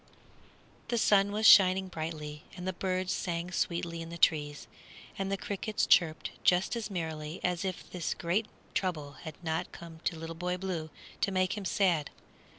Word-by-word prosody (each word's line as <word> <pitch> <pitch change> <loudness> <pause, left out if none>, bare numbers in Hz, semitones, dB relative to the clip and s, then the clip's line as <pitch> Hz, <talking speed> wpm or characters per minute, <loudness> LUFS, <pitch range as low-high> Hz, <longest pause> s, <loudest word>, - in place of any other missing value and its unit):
The 235 - 0
sun 205 -2 +4
was 215 +1 0
shining 190 -2 +8
brightly, 155 -3 -5 0.2
and 180 +1 -5
the 185 - 0
birds 185 +1 -1
sang 175 0 -2
sweetly 170 -1 -1
in 165 - -7
the 170 - -7
trees, 145 -3 +2 0.5
and 195 0 -2
the 195 - +1
crickets 205 +2 -1
chirped 160 -3 +3
just 180 +5 +3
as 230 -2 -3
merrily 160 -3 -4
as 180 0 0
if 185 -2 -4
this 175 -3 -2
great 185 +6 0 0.3
trouble 155 -7 -1
had 160 -2 -6
not 160 -1 -2
come 165 -1 -10
to 165 - 0
Little 165 +1 -6
Boy 180 +2 -2
Blue 180 -4 -3 0.3
to 200 - +2
make 185 0 +1
him 205 -2 -5
sad. 175 -5 +2
180 Hz, 170 wpm, -31 LUFS, 165-190 Hz, 0.5 s, shining